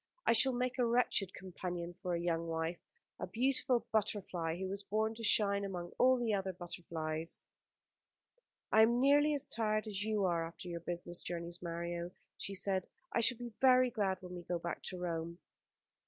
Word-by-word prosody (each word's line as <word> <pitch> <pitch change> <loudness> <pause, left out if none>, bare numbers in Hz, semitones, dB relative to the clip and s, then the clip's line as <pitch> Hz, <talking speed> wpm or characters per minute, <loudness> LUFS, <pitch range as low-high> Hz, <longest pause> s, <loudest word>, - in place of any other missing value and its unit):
I - - +5
should 255 +3 +7
make 250 +1 -2
a 245 - +4
wretched 230 -5 +3
companion 175 -2 -5
for 180 -1 -1
a - - -1
young 170 -1 -1
wife, 165 +1 -2 0.4
a - - -4
beautiful 255 0 +1
butterfly 190 -6 0
who 190 +1 -3
was 195 +1 -3
born 215 +2 -1
to 230 +1 -9
shine 200 -2 +4
among 180 -3 -5
all 255 +1 +5
the 235 -3 0
other 190 -1 -1
butterflies." 165 -2 -5 1.3
"I 220 - +6
am 235 +2 +4
nearly 290 +3 +4
as 285 0 +2
tired 215 -1 +1
as 205 -2 -1
you 215 -2 0
are 170 -2 +1
after 175 +2 -9
your 170 -1 -4
business 175 +1 -3
journeys, 170 0 -5
Mario," 170 0 -4 0.3
she 195 - -4
said. 190 -1 +2 0.3
"I - - +2
shall 235 +1 +4
be 240 -1 -7
very 255 -1 +5
glad 195 -5 -1
when 180 0 -8
we 175 - -6
can 175 - -3
go - - 0
back 170 0 -5
to 185 - -3
Rome." 170 -1 -4
190 Hz, 185 wpm, -34 LUFS, 175-225 Hz, 1.3 s, should